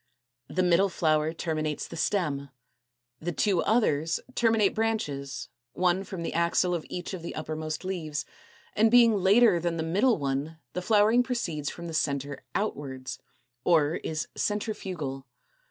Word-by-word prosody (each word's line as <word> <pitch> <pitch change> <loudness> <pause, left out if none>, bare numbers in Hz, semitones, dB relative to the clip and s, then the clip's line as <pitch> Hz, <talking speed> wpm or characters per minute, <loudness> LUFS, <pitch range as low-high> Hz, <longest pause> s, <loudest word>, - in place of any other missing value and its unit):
The 185 - 0
middle 180 +2 +4
flower, 155 -3 +2
a, 160 - -2
terminates 155 -2 -2
the - - -9
stem; 150 -6 -1 0.7
the 175 +2 -3
two 185 +1 +2
others, 165 -8 +2
b - - -13
b, - - -18
terminate 225 -4 +3
branches, 140 - -2 0.2
one 180 +1 +2
from 190 -3 -6
the - - -2
axil 170 +2 +2
of 170 -3 -3
each 180 +2 -5
of 185 - -5
the 170 - -6
uppermost 155 +2 -4
leaves; 160 -6 -3 0.5
and 220 +2 +5
being 235 -1 +7
later 200 0 +5
than 170 0 -1
the 160 - -1
middle 205 +9 +2
one, 140 +2 -2 0.2
the 180 - -2
flowering 215 +4 +4
proceeds 175 - -2
from 170 - -8
the 165 - -6
centre 140 -2 -1
outwards, 135 -10 -3 0.4
or 160 -2 +3
is 155 -3 -3
Centrifugal. 180 - -3
170 Hz, 155 wpm, -28 LUFS, 155-200 Hz, 0.7 s, being